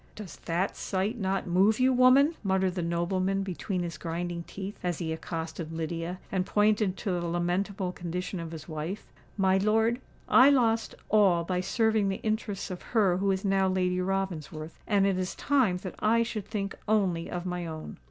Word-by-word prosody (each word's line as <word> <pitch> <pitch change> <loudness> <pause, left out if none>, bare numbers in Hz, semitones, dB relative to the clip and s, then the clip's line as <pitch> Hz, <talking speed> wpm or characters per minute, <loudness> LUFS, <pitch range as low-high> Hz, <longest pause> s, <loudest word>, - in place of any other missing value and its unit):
"Does 210 -4 -9
that 175 +3 0
sight 200 +5 -2
not 195 -1 -1
move 195 +5 +3
you, 260 +1 +4
woman?" 255 +5 +6
muttered 190 -2 +1
the 180 - -2
nobleman 185 +3 0
between 185 0 -3
his 170 -4 -5
grinding 170 +1 -3
teeth, 195 +1 -7
as 175 -3 -1
he 160 -2 -2
accosted 160 0 -5
Lydia, 165 +2 -4
and 190 -1 +1
pointed 210 -1 +2
to 205 - -2
the 175 -1 -1
lamentable 180 +3 -1
condition 180 +1 -4
of 165 -1 -5
his 160 -2 -8
wife. 160 +5 -5 0.3
"My 190 -1 +3
lord, 225 +4 +2 0.3
I 260 +2 +7
lost 230 -5 +2
all 195 -6 +4
by 180 +1 -1
serving 220 0 +2
the 190 - -2
interests 215 -3 -2
of 180 - -6 0.2
her 190 -5 +4
who 195 +1 0
is 190 +1 0
now 195 -1 +3
Lady 185 -1 +1
Ravensworth; 170 -5 -3
and 200 -2 +3
it 195 -2 +1
is 185 0 -3
time 255 -11 +2
that 185 - -5
I 230 +2 +3
should 215 -4 -5
think 200 -3 -3
only 190 -6 +1
of 180 0 -4
my 180 -1 -3
own." 155 -1 -7
190 Hz, 180 wpm, -28 LUFS, 175-210 Hz, 0.3 s, I